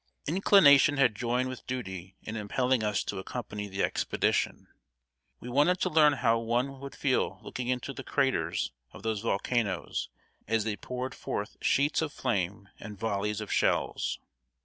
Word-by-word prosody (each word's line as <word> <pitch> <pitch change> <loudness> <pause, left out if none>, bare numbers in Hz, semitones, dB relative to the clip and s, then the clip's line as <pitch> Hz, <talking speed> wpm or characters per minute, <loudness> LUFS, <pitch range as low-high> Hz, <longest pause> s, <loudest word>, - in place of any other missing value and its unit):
Inclination 150 -5 +6
had 130 -5 +4
joined 125 +4 0
with 130 -1 -8
duty 95 -7 -5
in 110 - -6
impelling 125 +3 0
us 105 -2 0
to - - -4
accompany 105 0 -5
the 95 0 -2
expedition. - - 0 0.7
We - - -9
wanted 145 +9 +3
to - - +1
learn 155 -2 +6
how 115 -3 +2
one 120 +4 -1
would 140 0 -8
feel 135 -3 0
looking 125 -1 -5
into 125 +2 -2
the 135 - -7
craters 130 - 0 0.2
of - - -12
those 110 -2 -1
volcanoes 110 -1 -1 0.4
as 110 0 +1
they 110 -1 -1
poured 125 +5 -5
forth 105 +1 -4
sheets 145 +4 +2
of 160 -2 -2
flame 100 -6 -2
and 105 -2 -8
volleys 105 0 -1
of - - -4
shells. - - +1
120 Hz, 155 wpm, -29 LUFS, 105-135 Hz, 0.7 s, Inclination